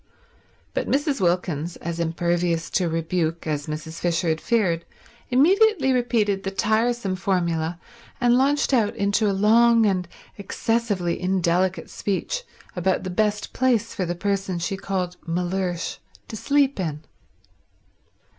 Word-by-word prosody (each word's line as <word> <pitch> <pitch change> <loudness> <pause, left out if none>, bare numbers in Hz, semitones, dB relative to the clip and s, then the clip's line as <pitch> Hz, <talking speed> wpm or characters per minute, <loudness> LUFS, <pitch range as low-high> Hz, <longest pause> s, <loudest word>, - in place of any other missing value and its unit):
But - - -2
Mrs. 285 -2 0
Wilkins, 175 -2 0
as 170 0 -5
impervious 170 0 0
to 180 -3 +1
rebuke 165 0 -1
as 150 -1 -2
Mrs. 155 +2 -6
Fisher 170 0 0
had 160 0 0
feared, 185 -8 +1 0.5
immediately 340 - +4
repeated 230 -5 +1
the 195 - -3
tiresome 220 0 0
formula 170 -3 -1 0.4
and 240 -1 +4
launched 280 +2 +2
out 225 -5 +2
into 205 +1 +1
a - - +2
long 225 +3 +5
and 185 -3 0 0.3
excessively 200 -4 -1
indelicate 180 -1 +1
speech 210 - -2 0.3
about 185 +1 0
the 185 - -4
best 210 +2 0
place 240 -4 +1
for 185 -4 -2
the 175 - -2
person 195 0 -1
she 170 +3 -2
called 185 -2 -3
Mellersh 180 +1 -2 0.3
to - - -6
sleep 280 +1 +1
in. 155 -5 -3
190 Hz, 130 wpm, -24 LUFS, 170-230 Hz, 0.5 s, long